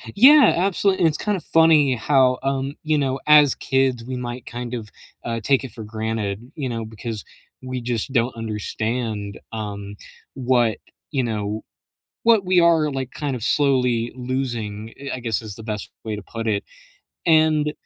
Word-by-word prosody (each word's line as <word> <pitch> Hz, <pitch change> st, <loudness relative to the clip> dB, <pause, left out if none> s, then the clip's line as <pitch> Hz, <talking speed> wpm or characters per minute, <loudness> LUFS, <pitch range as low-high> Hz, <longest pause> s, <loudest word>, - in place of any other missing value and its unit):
Yeah, 275 Hz, +7 st, +8 dB
absolute 195 Hz, +2 st, +1 dB
and 170 Hz, -, +4 dB
it's 150 Hz, -, -2 dB
kinda 205 Hz, -3 st, -1 dB
funny 160 Hz, -5 st, +4 dB
how, 130 Hz, +1 st, +3 dB
um, 135 Hz, +1 st, -1 dB
you 155 Hz, -1 st, +1 dB
know, 135 Hz, -1 st, -1 dB
as 150 Hz, -2 st, +7 dB
kids, 130 Hz, -3 st, 0 dB
we 130 Hz, +1 st, -5 dB
might 125 Hz, 0 st, -6 dB
kind 120 Hz, +1 st, -5 dB
of, 110 Hz, -3 st, -5 dB, 0.4 s
uh, 115 Hz, -1 st, -2 dB
take 135 Hz, +5 st, +2 dB
it 130 Hz, -, -7 dB
for 110 Hz, -1 st, -8 dB
granted, 110 Hz, +1 st, -4 dB
you 140 Hz, -4 st, -3 dB
know, 115 Hz, -2 st, -3 dB
because 110 Hz, -1 st, -6 dB, 0.4 s
we 130 Hz, 0 st, -4 dB
just 120 Hz, +1 st, -3 dB
don't 120 Hz, -1 st, +1 dB
understand, 110 Hz, -1 st, -3 dB
um, 100 Hz, -2 st, -6 dB, 0.4 s
what, 120 Hz, -4 st, +1 dB, 0.3 s
you 135 Hz, -3 st, +1 dB
know, 110 Hz, -2 st, -3 dB, 0.6 s
what 225 Hz, -4 st, +4 dB
we 180 Hz, -1 st, +4 dB
are, 165 Hz, -3 st, +4 dB
like, 135 Hz, -2 st, -4 dB
kind 145 Hz, -1 st, -3 dB
of 120 Hz, -, -8 dB
slowly 125 Hz, -3 st, +2 dB
losing, 120 Hz, -4 st, -4 dB
eh 140 Hz, 0 st, -7 dB
I 130 Hz, -, -4 dB
guess 115 Hz, -2 st, -2 dB
is 105 Hz, -2 st, -8 dB
the 110 Hz, -, -10 dB
best 105 Hz, -2 st, -5 dB
way 110 Hz, -1 st, -3 dB
to 105 Hz, -, -8 dB
put 115 Hz, +2 st, -6 dB
it, 100 Hz, -2 st, 0 dB, 0.6 s
and 155 Hz, -2 st, +3 dB
125 Hz, 170 wpm, -22 LUFS, 110-145 Hz, 0.6 s, Yeah